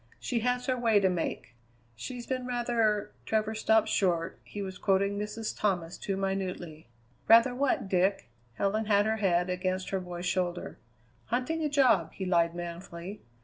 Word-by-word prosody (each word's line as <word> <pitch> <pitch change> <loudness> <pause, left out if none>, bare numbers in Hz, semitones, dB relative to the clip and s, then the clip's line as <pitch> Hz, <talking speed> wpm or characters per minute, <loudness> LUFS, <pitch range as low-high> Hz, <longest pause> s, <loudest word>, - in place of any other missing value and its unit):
She 240 - -1
has 250 +2 0
her 255 - +1
way 230 -4 +3
to 190 -1 +3
make. 170 -7 -3 0.4
She's 240 - -6
been 255 -1 -3
rather 235 -4 +1
" - - -33
Travers 220 0 0
stopped 220 0 +4
short; 175 -5 0
he 205 - -6
was 190 -1 -7
quoting 200 +1 +1
Mrs. 210 +1 -4
Thomas 180 -4 -1
too 195 -1 -3
minutely. 185 -6 -3 0.4
"Rather 230 +3 +7
what, 260 -5 0
Dick?" 190 +1 +1 0.3
Helen 210 - 0
had 205 -1 +3
her 220 0 +1
head 180 -4 +2
against 185 +1 -2
her 195 - 0
boy's 180 -1 -6
shoulder. 180 0 -2 0.5
"Hunting 255 +8 -1
a 300 - +1
job," 255 - +3
he 190 - -5
lied 170 -2 +2
manfully. 175 +3 -7
200 Hz, 165 wpm, -29 LUFS, 180-225 Hz, 0.5 s, Rather